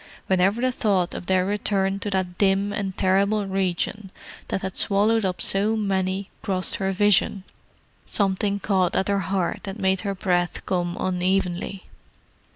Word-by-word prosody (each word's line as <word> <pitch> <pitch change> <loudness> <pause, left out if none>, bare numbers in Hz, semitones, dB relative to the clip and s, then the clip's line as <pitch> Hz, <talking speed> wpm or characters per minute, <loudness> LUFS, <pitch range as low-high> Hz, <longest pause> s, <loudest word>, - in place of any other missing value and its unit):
Whenever 190 +4 +2
the 255 0 +2
thought 195 -7 0
of - - -7
their 185 -1 +2
return 195 -1 0
to 205 - -3
that 185 -2 -2
dim 200 0 +2
and 200 -3 -3
terrible 200 +2 +2
region 195 +1 -2 0.4
that 190 - -3
had 190 -1 -4
swallowed 215 +3 +2
up 185 -2 -1
so 205 +5 +2
many 190 -2 -1
crossed 185 -2 0
her 195 -1 -1
vision, 200 0 +2 0.6
something 200 0 0
caught 190 -3 +1
at 190 - +1
her 200 0 +2
heart 185 -1 -1
and 195 +2 -5
made 190 -2 +1
her 200 -1 -2
breath 180 -2 -1
come 175 -1 -1
unevenly. 185 0 -1
195 Hz, 155 wpm, -24 LUFS, 185-200 Hz, 0.6 s, Whenever